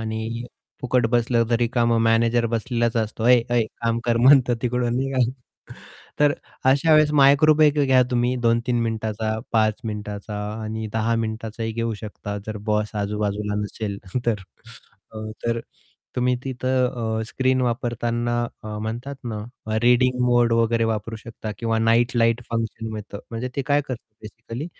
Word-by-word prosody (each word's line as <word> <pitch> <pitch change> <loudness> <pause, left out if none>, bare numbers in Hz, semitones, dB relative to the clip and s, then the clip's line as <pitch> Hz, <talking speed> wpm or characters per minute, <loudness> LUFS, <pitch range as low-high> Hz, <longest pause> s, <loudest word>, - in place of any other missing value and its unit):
आणि 110 +1 -4 0.4
फुकट 125 -2 +2
बसलं 120 -1 +2
तरी 120 0 +2
का 120 -1 +1
मग 115 -1 +3
मॅनेजर 115 +1 +3
बसलेलाच 115 0 0
असतो. 110 0 -2
"ऐ 125 -1 +7
ऐ 120 -1 +3 0.2
काम 115 0 +1
कर" 120 -1 +2
म्हणतो 125 0 +6
तिकडून 125 0 0
निघा. 135 0 -1 1.0
तर 145 -1 +5 0.4
अशा 150 +4 +3
वेळेस 155 -1 +4
मायक्रोब्रेक 150 +2 +5
घ्या 130 -2 +5
तुम्ही 120 +1 +1
2-3 120 0 +1
मिनिटाचा 110 -1 -2
5 110 -2 +3
मिनिटाचा 105 -1 -5 0.3
आणि 110 0 -4
10 115 +1 +1
मिनिटाचाही 110 0 -3
घेऊ 115 0 -2
शकता 105 -1 -6
जर 110 -1 -4
बॉस 105 0 0
आजूबाजूला 105 0 -2
नसेल 105 -1 -4 0.3
तर. 110 -4 +1 1.0
तर 115 0 0 0.6
तुम्ही 125 0 +2
तिथं 125 -3 -1
अ, - - -1
स्क्रीन 130 +1 +1
वापरताना 120 -1 -1 0.3
म्हणतात 120 +6 -4
ना, 110 -3 -4 0.4
रीडिंग 125 +1 +3
मोड 120 -1 +3
वगैरे 115 0 +2
वापरू 110 0 -2
शकता 110 0 -8
किंवा 115 -1 0
नाईट 115 +3 +2
लाईट 115 +1 +2
फंक्शन 115 -1 -3
मिळतं 105 -1 -7
म्हणजे 115 +2 -3
ते 140 - 0
काय 145 +1 +2
करतं 130 -3 -5 0.2
बेसिकली 115 +5 -7
115 Hz, 145 wpm, -23 LUFS, 110-125 Hz, 1.0 s, ऐ